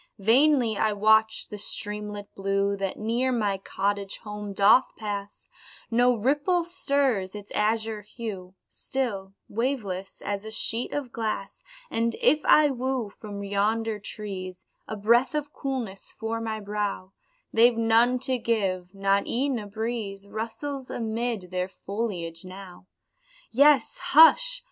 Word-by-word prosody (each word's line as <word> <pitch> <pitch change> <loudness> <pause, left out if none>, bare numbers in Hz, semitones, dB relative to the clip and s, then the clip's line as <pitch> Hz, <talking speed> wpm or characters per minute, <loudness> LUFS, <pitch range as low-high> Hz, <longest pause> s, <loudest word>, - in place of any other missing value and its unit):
Vainly 235 +1 +4
I 215 -1 +2
watch 220 +1 +3
the 210 - -7
streamlet 210 0 -4
blue 195 0 0
That 195 -1 -3
near 235 +4 0
my 205 -5 0
cottage 200 +1 -2
home 210 -1 -6
doth 200 +6 +5
pass, 205 -2 -6 0.4
No 245 +2 +4
ripple 295 - +1
stirs 275 - 0
its 205 -1 -9
azure 220 0 0
hue, 200 -4 -7
Still 200 -8 -4
waveless, 205 -5 -3
as 200 0 -2
a 220 - -7
sheet 225 +2 +1
of 275 -4 -4
glass 215 -4 -4 0.3
And 230 0 0
if 300 +1 +3
I 300 -2 +6
woo 255 -4 -2
from 205 -1 -8
yonder 210 +2 0
trees 190 -3 -7 0.2
A 220 - -4
breath 235 +7 +3
of 295 -1 -3
coolness 245 -8 -4
for 225 +1 -2
my 220 -1 -3
brow, 205 -2 -3 0.4
They've 235 +1 +5
none 230 +2 +4
to 260 -1 0
give 195 -5 -1
not 195 0 +1
e'en 260 0 0
a 205 - -7
breeze 215 -2 -4
Rustles 230 +6 -5
amid 225 -4 -3
their 180 0 -2
foliage 190 -6 -4
now; 185 -1 -11 0.6
Yes, 295 - +4
hush! - - +6
220 Hz, 135 wpm, -26 LUFS, 200-245 Hz, 0.6 s, I